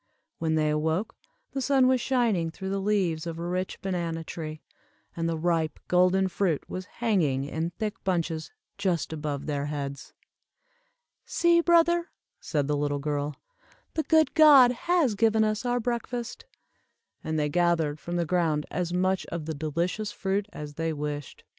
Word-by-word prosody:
When 160 -1 0
they 155 -1 +2
awoke, 160 +6 -1 0.4
the 270 - -3
sun 265 0 +4
was 255 -1 +3
shining 230 -11 +1
through 190 +4 -6
the 195 0 -1
leaves 185 -6 0
of 165 -1 -4
a 170 - -5
rich 185 +1 -3
banana 170 -4 -2
tree, 155 -1 -7 0.5
and 165 0 -1
the 165 - -1
ripe 160 -2 0
golden 185 +1 +3
fruit 180 -4 -1
was 185 +1 -6 0.2
hanging 155 - +2
in 160 +4 -2
thick 215 +5 -5
bunches 165 -4 -1 0.3
just 180 -5 0
above 150 -2 -4
their 145 -1 -2
heads. 140 -2 -5 1.1
"See, 340 0 +3
brother," 340 0 +3 0.3
said 145 -4 -1
the 150 - +1
little 145 0 0
girl, 145 0 -2 0.6
"the 315 - 0
good 315 0 +3
God 285 -6 +8
has 310 0 +1
given 220 +1 +3
us 215 +2 -1
our 245 0 +1
breakfast;" 240 - -4 0.8
and 160 0 -2
they 150 -1 +1
gathered 165 -2 +1
from 175 - -5
the 170 -1 +1
ground 160 -3 +1
as 175 +1 -2
much 185 +1 0
of 165 -2 -5
the 160 - -3
delicious 170 +8 -2
fruit 195 0 -1
as 150 -1 -7
they 165 +2 -2
wished. 150 -2 -5
175 Hz, 160 wpm, -27 LUFS, 155-215 Hz, 1.1 s, God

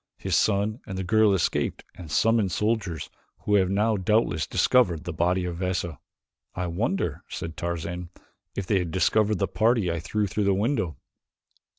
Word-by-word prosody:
His - - -1
son 105 +2 +1
and 95 -3 -5
the 95 - -2
girl 110 +3 +4
escaped 95 -4 0
and 85 -4 -10
summoned 110 +5 +2
soldiers 100 -9 -1 0.3
who 105 - -1
have 95 -3 +4
now 105 +2 +2
doubtless 95 -5 +1
discovered 90 -11 +3
the 85 - -5
body 90 +3 +1
of 85 -1 -4
Veza." 90 -4 -2 0.6
"I 90 - -2
wonder," 90 - -2
said 80 -1 -5
Tarzan, 85 +1 -4 0.5
"if 100 - -3
they 100 0 +2
have 90 -2 -2
discovered 105 +4 +2
the - - 0
party 110 -5 +2
I 85 - -2
threw 105 +6 -1
through 100 +1 -1
the 100 -1 +3
window." 105 - -1
95 Hz, 170 wpm, -26 LUFS, 85-110 Hz, 0.6 s, girl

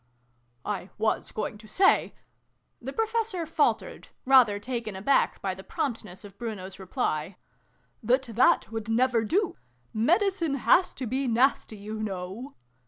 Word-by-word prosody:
" 120 0 -42
I 185 - -12
was 220 0 0
going 210 0 -4
to 215 - -14
say 375 - +3 0.7
the 260 +2 -5
Professor 445 -3 -1
faltered, 310 -1 0 0.2
rather 255 -6 +6
taken 230 -1 -4
aback 240 +9 +2
by 190 -1 -1
the 190 +1 -11
prompt 240 +1 -3
ness 180 +3 -12
of 200 -1 -14
Bruno's 200 -5 -6
reply, 180 -2 -2 0.3
" - - -41
that 250 +4 +2
that 235 -2 +2
would 225 -1 -5
never 235 0 +2
do! 370 - 0 0.4
Medicine 335 - +2
has 275 +8 +4
to 260 - -4
be 260 +3 -1
nasty, 235 -2 +2
you 215 +2 -6
know. 195 +6 -5
230 Hz, 150 wpm, -27 LUFS, 205-270 Hz, 0.7 s, rather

